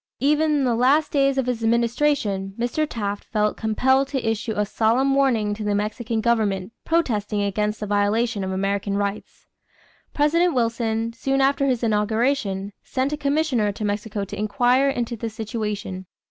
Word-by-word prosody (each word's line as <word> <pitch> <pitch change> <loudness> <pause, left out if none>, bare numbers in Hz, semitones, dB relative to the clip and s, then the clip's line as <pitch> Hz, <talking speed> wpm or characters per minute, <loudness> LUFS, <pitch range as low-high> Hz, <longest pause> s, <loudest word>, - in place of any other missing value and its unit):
Even 300 +4 +2
in 290 -2 +2
the 245 -2 +2
last 270 +6 +3
days 275 -1 +2
of 265 - +1
his 245 -2 -2
administration, 230 -4 +1
Mr. 245 +6 -1
Taft 205 -4 -3
felt 210 -1 0
compelled 265 +5 +2
to 270 -4 -3
issue 225 0 -1
a 210 - +1
solemn 230 +6 +2
warning 240 -7 +2
to 215 +1 -6
the 205 -1 0
Mexican 220 +2 -2
government 215 -4 0
protesting 215 -11 0
against 210 +2 -1
the - - -2
violation 205 +1 +1
of 190 - -3
American 200 +1 -1
rights. 200 0 -4 0.7
President 335 +3 +2
Wilson, 230 -1 0
soon 270 +4 -1
after 275 +1 +2
his 250 -3 0
inauguration, 210 -2 0
sent 265 +2 -2
a - - +1
commissioner 280 -7 +1
to 210 +1 -5
Mexico 205 0 -2
to - - -7
inquire 245 +6 +2
into 240 -3 -2
the 230 0 -4
situation. 210 -4 -5
225 Hz, 160 wpm, -23 LUFS, 210-265 Hz, 0.7 s, last